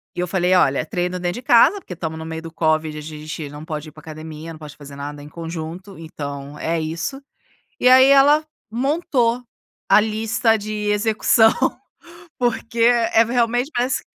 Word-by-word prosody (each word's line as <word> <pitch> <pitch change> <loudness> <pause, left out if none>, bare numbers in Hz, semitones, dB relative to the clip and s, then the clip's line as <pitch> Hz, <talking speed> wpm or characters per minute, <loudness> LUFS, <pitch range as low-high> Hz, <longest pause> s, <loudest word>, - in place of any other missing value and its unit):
E - - -6
eu 180 - -1
falei: 180 +1 +1
"Olha, 140 -5 +2
treino 180 +2 -3
dentro 175 0 -2
de 245 - -6
casa, 240 - +5
porque 260 - -9
estamos 160 -2 -5
no 160 - -7
meio 160 0 -6
do 165 0 -9
covid, 155 -1 0
a - - -6
gente 155 0 -7
não 145 +1 -10
pode 155 -1 -6
ir - - -17
para 155 - -15
academia, 155 +1 -9
não 160 - -10
pode 150 -2 -10
fazer 145 -1 -12
nada 145 +1 -7
em 145 - -11
conjunto, 170 +4 -7
então 145 -3 -7
é 165 +1 -1
isso. 165 - -4 0.6
E - - +3
aí, 260 +1 +8
ela 285 +2 +6 0.3
montou 250 -2 0 0.4
a - - +6
lista 220 +1 +1
de 215 0 -6 0.2
execução, 220 +1 +3 0.9
porque 235 -1 -2
é, 230 -1 +4
realmente, 245 +2 0
parece 245 +2 0
175 Hz, 180 wpm, -21 LUFS, 155-230 Hz, 0.9 s, aí